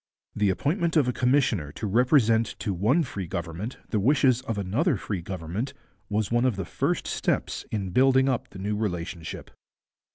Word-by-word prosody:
The 105 -1 +2
appointment 165 - 0
of 145 -5 +4
a 125 - +1
commissioner 125 - +1
to 110 - -5
represent 115 0 +3
to 100 - -2
one 115 - +2
free 100 - -5
government 85 +7 -5
the 110 - +1
wishes 130 +2 +3
of 115 -4 -4
another 105 - +1
free 95 -1 -4
government 95 - -4 0.3
was 105 +1 -1
one 120 +1 +3
of 130 -4 +2
the 95 -2 -4
first - - -1
steps - - -1
in 100 -4 -3
building 130 +3 +4
up 130 -3 -1
the 95 - -11
new 100 +2 -2
relationship. 90 -5 -4
110 Hz, 170 wpm, -26 LUFS, 95-130 Hz, 0.3 s, of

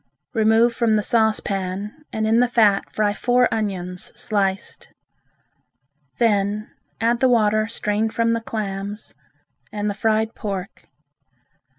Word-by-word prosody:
Remove 225 +1 +4
from 230 -2 +1
the 210 -1 +2
saucepan 205 -3 0 0.2
and 220 0 -1
in 225 +2 +3
the 245 - +4
fat 215 -5 +2
fry 210 -1 +1
four 245 +3 +2
onions 180 -4 -3
sliced. 195 -3 -2 1.3
Then 210 -1 +1 0.3
add 235 +1 +1
the 260 - +4
water 215 -2 +3
strained 220 -1 -1
from 230 0 +1
the 230 0 0
clams 205 -2 -5 0.6
and 210 0 -2
the - - -3
fried 220 +1 0
pork. 195 -3 -6
215 Hz, 120 wpm, -22 LUFS, 205-230 Hz, 1.3 s, Remove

